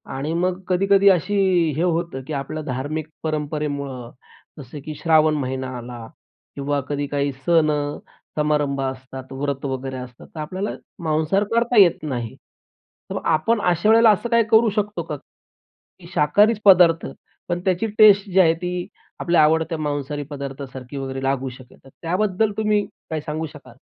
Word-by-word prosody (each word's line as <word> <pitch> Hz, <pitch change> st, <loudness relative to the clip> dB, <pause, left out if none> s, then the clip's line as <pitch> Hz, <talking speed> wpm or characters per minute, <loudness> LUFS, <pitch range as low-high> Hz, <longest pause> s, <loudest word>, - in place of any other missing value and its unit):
आणि 145 Hz, +4 st, -3 dB
मग 180 Hz, +2 st, 0 dB
कधी-कधी 195 Hz, +2 st, +4 dB
अशी 190 Hz, +2 st, +2 dB, 0.4 s
हे 160 Hz, -, 0 dB
होतं, 170 Hz, -5 st, -1 dB
की 155 Hz, -, -4 dB
आपल्या 150 Hz, +2 st, -4 dB
धार्मिक 145 Hz, +4 st, -4 dB, 0.2 s
परंपरेमुळं 145 Hz, -5 st, -3 dB, 0.5 s
जसं 140 Hz, +2 st, -9 dB
की 155 Hz, -1 st, -6 dB
श्रावण 155 Hz, -1 st, +3 dB
महिना 130 Hz, -2 st, -3 dB
आला 120 Hz, -1 st, -8 dB, 0.5 s
किंवा 140 Hz, 0 st, -1 dB
कधी 145 Hz, -1 st, -2 dB
काही 140 Hz, 0 st, -1 dB
सण 165 Hz, -3 st, +4 dB, 0.7 s
समारंभ 150 Hz, -2 st, +1 dB
असतात, 130 Hz, 0 st, -6 dB
व्रत 140 Hz, +1 st, -3 dB
वगैरे 130 Hz, -1 st, -4 dB
असतात 125 Hz, -1 st, -10 dB
तर -, -, -6 dB
आपल्याला 185 Hz, +7 st, -3 dB, 0.3 s
मांसाहार 160 Hz, +5 st, +1 dB
करता 235 Hz, 0 st, +2 dB
येत 175 Hz, -4 st, +3 dB
नाही. 120 Hz, -7 st, -4 dB, 0.7 s
तर -, -, -4 dB
मग -, -, -3 dB
आपण 170 Hz, +8 st, +2 dB
अशा 175 Hz, +5 st, +1 dB
वेळेला 225 Hz, 0 st, +7 dB
असं 225 Hz, +4 st, -1 dB
काही 235 Hz, -1 st, +4 dB
करू 220 Hz, +1 st, +6 dB
शकतो 210 Hz, 0 st, -1 dB
का? -, -, -5 dB, 0.8 s
की 170 Hz, -, -13 dB
शाकाहारीचं 205 Hz, +9 st, +3 dB
पदार्थ 170 Hz, -3 st, +6 dB, 0.4 s
पण 175 Hz, 0 st, 0 dB
त्याची 185 Hz, +3 st, +1 dB
टेस्ट 205 Hz, -1 st, +6 dB
जी 190 Hz, -, +3 dB
आहे, 165 Hz, -3 st, +6 dB
ती 180 Hz, +1 st, -4 dB, 0.3 s
आपल्या 170 Hz, -2 st, +3 dB
आवडत्या 160 Hz, +1 st, +2 dB
मांसाहारी 145 Hz, -1 st, -3 dB
पदार्थासारखी 135 Hz, -2 st, -7 dB
वगैरे 135 Hz, 0 st, -4 dB
लागू 135 Hz, -1 st, -1 dB
शकेल. 130 Hz, 0 st, -14 dB
तर 135 Hz, -, -16 dB
त्याबद्दल 195 Hz, +4 st, 0 dB
तुम्ही 210 Hz, -1 st, +1 dB, 0.2 s
काय 155 Hz, -1 st, -2 dB
सांगू 155 Hz, +2 st, -4 dB
शकाल? 140 Hz, -5 st, -14 dB
155 Hz, 155 wpm, -22 LUFS, 140-180 Hz, 0.8 s, वेळेला